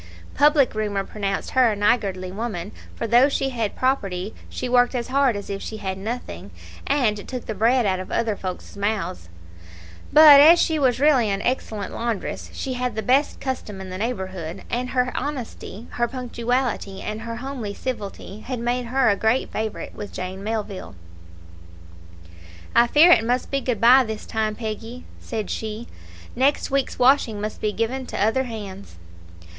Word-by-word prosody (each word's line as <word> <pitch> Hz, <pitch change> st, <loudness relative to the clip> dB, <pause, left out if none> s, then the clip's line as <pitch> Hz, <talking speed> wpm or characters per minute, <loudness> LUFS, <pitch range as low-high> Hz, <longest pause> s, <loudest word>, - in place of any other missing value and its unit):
Public 290 Hz, -2 st, +4 dB
rumour 205 Hz, -2 st, -1 dB
pronounced 195 Hz, -1 st, -3 dB
her 255 Hz, -3 st, +4 dB
a -, -, -2 dB
niggardly 200 Hz, -3 st, 0 dB
woman, 205 Hz, -3 st, -4 dB, 0.2 s
for -, -, -3 dB
though 240 Hz, +5 st, +5 dB
she 270 Hz, -1 st, 0 dB
had 230 Hz, -5 st, -2 dB
property 205 Hz, -7 st, -1 dB, 0.2 s
she -, -, -4 dB
worked 245 Hz, +1 st, +3 dB
as 240 Hz, -1 st, -3 dB
hard 270 Hz, -3 st, +3 dB
as 200 Hz, -, -6 dB
if 200 Hz, 0 st, -4 dB
she 220 Hz, -, -6 dB
had 190 Hz, -3 st, -3 dB
nothing, 230 Hz, +5 st, -6 dB, 0.4 s
and 225 Hz, -8 st, 0 dB
took 255 Hz, -2 st, -5 dB
the 220 Hz, -, -3 dB
bread 235 Hz, +3 st, +2 dB
out 190 Hz, -2 st, +1 dB
of 185 Hz, -, -7 dB
other 230 Hz, -2 st, 0 dB
folk's 185 Hz, 0 st, -7 dB
mouths; 200 Hz, -, -3 dB, 0.8 s
but 300 Hz, -2 st, +10 dB
as 325 Hz, +4 st, +8 dB
she 320 Hz, -2 st, +1 dB
was 255 Hz, -3 st, +2 dB
really 270 Hz, -6 st, +4 dB
an 195 Hz, 0 st, -1 dB
excellent 220 Hz, -5 st, -2 dB
laundress, 230 Hz, -3 st, -3 dB
she 265 Hz, -, -4 dB
had 250 Hz, -2 st, -2 dB
the 220 Hz, -, -2 dB
best 270 Hz, +4 st, +2 dB
custom 245 Hz, -7 st, -4 dB
in 190 Hz, -1 st, -8 dB
the 185 Hz, -, -5 dB
neighbourhood, 190 Hz, -6 st, -4 dB
and 250 Hz, +1 st, -1 dB
her 250 Hz, -1 st, 0 dB
honesty, 245 Hz, -6 st, -5 dB
her 240 Hz, 0 st, 0 dB
punctuality, 245 Hz, -4 st, -2 dB
and 215 Hz, +1 st, -4 dB
her 230 Hz, 0 st, -5 dB
homely 245 Hz, -4 st, -5 dB
civility, 205 Hz, -3 st, -6 dB
had 250 Hz, +3 st, -5 dB
made 240 Hz, +1 st, -1 dB
her 260 Hz, +2 st, +2 dB
a 205 Hz, -, +4 dB
great 220 Hz, +5 st, +1 dB
favourite 220 Hz, -1 st, -4 dB
with 205 Hz, -, -7 dB
Jane 185 Hz, +1 st, -6 dB
Melville. 210 Hz, -, -4 dB, 1.8 s
"I 235 Hz, 0 st, +6 dB
fear 310 Hz, +8 st, +6 dB
it 225 Hz, -, +6 dB
must 245 Hz, +2 st, -1 dB
be 275 Hz, 0 st, 0 dB
good 245 Hz, -6 st, -1 dB
bye 255 Hz, +3 st, +7 dB
this 220 Hz, -2 st, -6 dB
time, 215 Hz, -1 st, -1 dB
Peggy," 225 Hz, +2 st, -6 dB
said 220 Hz, -4 st, -4 dB
she; 220 Hz, +1 st, -5 dB, 0.5 s
"next 275 Hz, +2 st, +1 dB
week's 275 Hz, -1 st, 0 dB
washing 250 Hz, -4 st, +3 dB
must 215 Hz, +1 st, -5 dB
be 210 Hz, -, 0 dB
given 245 Hz, +5 st, -2 dB
to -, -, -5 dB
other 225 Hz, +6 st, +2 dB
hands." 200 Hz, -, -8 dB
230 Hz, 170 wpm, -23 LUFS, 205-255 Hz, 1.8 s, but